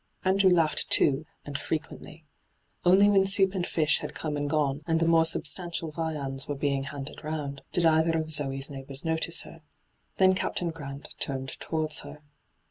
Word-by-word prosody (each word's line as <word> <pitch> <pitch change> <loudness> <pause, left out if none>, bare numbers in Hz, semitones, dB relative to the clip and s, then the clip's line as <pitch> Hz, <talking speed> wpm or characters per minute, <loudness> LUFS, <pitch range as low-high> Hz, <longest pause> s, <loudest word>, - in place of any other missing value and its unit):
Andrew 190 0 +4
laughed, 165 -4 +1
too, 145 +2 +3 0.2
and 145 0 -5
frequently. 155 0 -6 0.6
Only 190 +3 +5
when 195 -2 +4
soup 195 -1 +4
and 180 -3 -2
fish 155 -2 +1
had - - -7
come 155 -2 -3
and 145 0 -2
gone, 145 -2 0
and 165 -1 +1
the 165 - +1
more 165 0 +4
substantial 165 0 +1
viands 150 -4 -1
were 145 - -3
being 140 -1 -1
handed 140 +1 -8
round, 150 -3 -5
did 175 - 0
either 160 0 +3
of 160 0 -3
Zoe's 135 -2 0
neighbours 135 +1 -7
notice 160 +1 +1
her. 165 - -13 0.6
Then 190 0 +5
Captain 180 -2 -2
Grant 140 -3 -9
turned 135 -1 -3
towards 155 -1 -1
her. 145 +1 -11
155 Hz, 170 wpm, -27 LUFS, 145-165 Hz, 0.6 s, Only